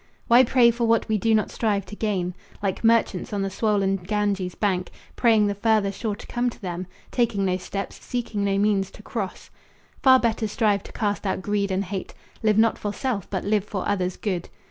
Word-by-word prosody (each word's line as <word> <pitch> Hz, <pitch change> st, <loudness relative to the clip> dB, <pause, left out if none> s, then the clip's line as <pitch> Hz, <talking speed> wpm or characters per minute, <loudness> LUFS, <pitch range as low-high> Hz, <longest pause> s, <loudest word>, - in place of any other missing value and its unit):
Why 240 Hz, +2 st, +7 dB
pray 240 Hz, -1 st, +5 dB
for 235 Hz, 0 st, -1 dB
what 230 Hz, 0 st, +2 dB
we 215 Hz, -1 st, +1 dB
do 225 Hz, +2 st, +3 dB
not 215 Hz, -, 0 dB
strive 205 Hz, -4 st, 0 dB
to 205 Hz, -, -9 dB
gain? 190 Hz, -5 st, -1 dB, 0.3 s
Like 195 Hz, +1 st, -1 dB
merchants 225 Hz, -5 st, +2 dB
on 200 Hz, -1 st, 0 dB
the 195 Hz, -, -2 dB
swollen 200 Hz, -2 st, +1 dB
Ganges' 195 Hz, -1 st, -1 dB
bank 185 Hz, -3 st, 0 dB, 0.3 s
Praying 225 Hz, -3 st, +4 dB
the 205 Hz, -, +1 dB
farther 205 Hz, -1 st, +2 dB
shore 210 Hz, +1 st, -3 dB
to -, -, -12 dB
come 245 Hz, +1 st, 0 dB
to -, -, -12 dB
them, 180 Hz, -2 st, -5 dB, 0.2 s
Taking 225 Hz, -5 st, +1 dB
no 185 Hz, -1 st, +1 dB
steps, 195 Hz, +2 st, -6 dB
seeking 230 Hz, -4 st, -3 dB
no 195 Hz, -1 st, +1 dB
means, 200 Hz, -2 st, +2 dB
to 210 Hz, -, -15 dB
cross. 205 Hz, -5 st, -5 dB, 0.5 s
Far 260 Hz, -1 st, +7 dB
better 225 Hz, -2 st, 0 dB
strive 210 Hz, -2 st, +1 dB
to -, -, -10 dB
cast 205 Hz, -2 st, -2 dB
out 190 Hz, 0 st, -2 dB
greed 205 Hz, -1 st, 0 dB
and 190 Hz, +1 st, 0 dB
hate. 190 Hz, 0 st, -5 dB, 0.3 s
Live 215 Hz, -2 st, +3 dB
not 225 Hz, 0 st, +3 dB
for 205 Hz, -, -2 dB
self, 230 Hz, -4 st, -3 dB
but 190 Hz, -, -2 dB
live 205 Hz, -1 st, +2 dB
for 195 Hz, -3 st, -4 dB
others' 185 Hz, -3 st, -1 dB
good. 185 Hz, -5 st, -3 dB
205 Hz, 210 wpm, -24 LUFS, 195-225 Hz, 0.5 s, Why